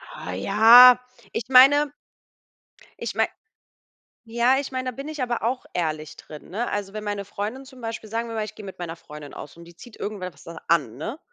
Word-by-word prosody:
Ah 90 - -7
ja, 230 - +8 0.3
ich - - -3
meine 285 +3 +6 1.1
ich - - -5
meine - - +2 1.0
ja, 235 +3 +2
ich 275 - -5
meine, 255 0 -3
da 240 - -9
bin 275 +2 -7
ich 310 -3 -6
aber 240 -3 -2
auch 250 +2 -2
ehrlich 155 -3 -3
drin, 150 -1 -12
ne? 230 +6 -3
Also, 205 -1 -4
wenn 215 0 -6
meine 205 -1 -4
Freundin 210 +7 -5
zum 260 -1 -15
Beispiel 225 -2 -6
sagen 230 +2 -3
wir 230 - -7
mal, 220 - -1
ich 210 0 -8
gehe 210 - -10
mit 190 - -10
meiner 170 -1 -5
Freundin 150 -3 -12
aus 145 - -10
und 170 0 -14
die 170 - -16
zieht 235 +6 -14
irgendwe 205 -3 -5
es 180 -2 -11
an, 160 -7 -1
ne? 225 - -6
215 Hz, 205 wpm, -24 LUFS, 175-250 Hz, 1.1 s, ja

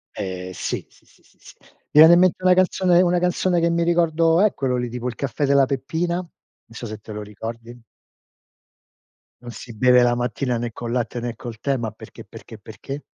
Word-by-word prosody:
Eh 95 -2 -5
sì, - - -4
sì, - - -26
sì, - - -27
sì, - - -29
sì. - - -15
Mi - - -24 0.3
viene 160 +2 +9
in 175 - +6
mente 185 0 +2
una 185 0 +5
canzone 185 -1 +3
una 180 -1 +2
canzone 180 0 +1
che 170 0 +2
mi 170 0 +1
ricordo 165 0 +2
è 215 - +3
quello 130 -2 -1
lì, 120 -1 -3
tipo 125 +1 -5
Il 120 - -4
caffè 140 +3 -2
della 140 -1 +4
Peppina, 160 +6 -2
non 175 -2 -5 0.4
so 115 +1 -9
se 110 -1 -6
te 105 +1 -13
lo 105 0 -6
ricordi. 115 +3 -9 1.6
Non 120 -1 -9
si 120 +2 -10
beve 125 +2 +5
la 120 0 +3
mattina 125 +1 -2
né 120 0 -4
col 115 +1 -6
latte 120 0 -2
né 120 -1 -5
col 115 -1 -9
tè, 140 -2 -1
ma 110 -3 -4
perché, - - -13
perché, - - -12
perché? 140 +2 -9
125 Hz, 210 wpm, -22 LUFS, 115-170 Hz, 1.6 s, viene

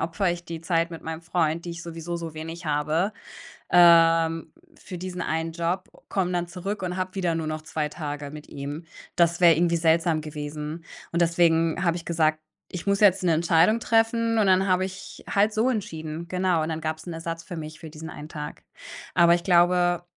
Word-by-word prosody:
opfere 170 +3 0
ich 175 0 -7
die 165 -1 -6
Zeit 165 0 0
mit 165 - -8
meinem 160 0 -5
Freund, 165 0 0
die 170 - -5
ich 170 +1 -7
sowieso 170 0 -5
so 165 -2 -6
wenig 165 +2 -7
habe, 155 +7 0 0.6
ähm, 165 -1 +5 0.2
für 185 - -9
diesen 180 -1 -5
einen 160 +1 -2
Job, 170 +3 -2 0.2
komme 185 -2 -1
dann 175 -1 -1
zurück 190 +3 -5
und 180 0 -2
habe 185 +1 -3
wieder 175 -3 0
nur 160 -1 -2
noch 155 0 -4
2 155 -1 -3
Tage 145 -2 -5
mit 150 0 -10
ihm. 145 +3 -6 0.3
Das 170 0 +3
wäre 170 -3 +7
irgendwie 170 +1 +2
seltsam 165 -1 +2
gewesen 150 +2 -6 0.3
und 170 +1 0
deswegen 165 0 +2
habe 170 -1 +1
ich 170 - -9
gesagt: 155 -2 +1 0.3
„Ich 180 +2 -6
muss 200 +1 +2
jetzt 195 -2 +5
'ne 170 -2 +3
Entscheidung 170 +7 +3
treffen“ 230 0 +2
und 205 - +3
dann 190 +1 +4
habe 185 0 +2
ich 190 +1 -10
halt 205 +2 +2
so 220 +4 +2
entschieden. 165 -7 -4
Genau, 180 -2 +1
und 155 - -3
dann 160 -1 -3
gab's 160 +1 -4
'n 175 - -4
Ersatz 165 0 -5
für 180 -3 -8
mich 155 0 -8
für 160 - -8
diesen 160 +1 -9
einen 150 +1 -9
Tag. 150 -2 -7 0.5
Aber 170 0 +6
ich 175 - -4
glaube, 175 -1 +3
170 Hz, 200 wpm, -25 LUFS, 160-180 Hz, 0.6 s, wäre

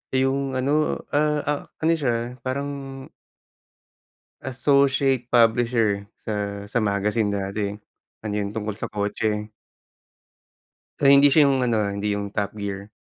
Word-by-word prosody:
Eh, 130 - +3
yung 135 0 -1
ano 145 +4 0
ah 150 0 +1
ah 145 0 -1 0.2
ano 160 - +4
siya, 120 -2 -2
parang 135 +3 -3 1.8
associate 135 -1 +2
publisher 115 -3 +3 0.2
sa 100 -1 -4
sa 120 - -1
magazine 105 0 0
dati. 100 +1 -2 0.5
Ano 105 -1 -4
yun 100 0 -3
tungkol 105 -1 -4
sa - - -4
kotse. 105 +1 -2 1.5
Pero 140 -1 +6
hindi 140 +1 +7
siya 150 +1 +6
yung 135 -2 +2
ano, 120 -3 +1
ah, 100 -2 0
hindi 100 0 -1
yung 100 0 -5
Top 105 0 -2
Gear. 100 0 -5
115 Hz, 135 wpm, -23 LUFS, 105-135 Hz, 1.8 s, hindi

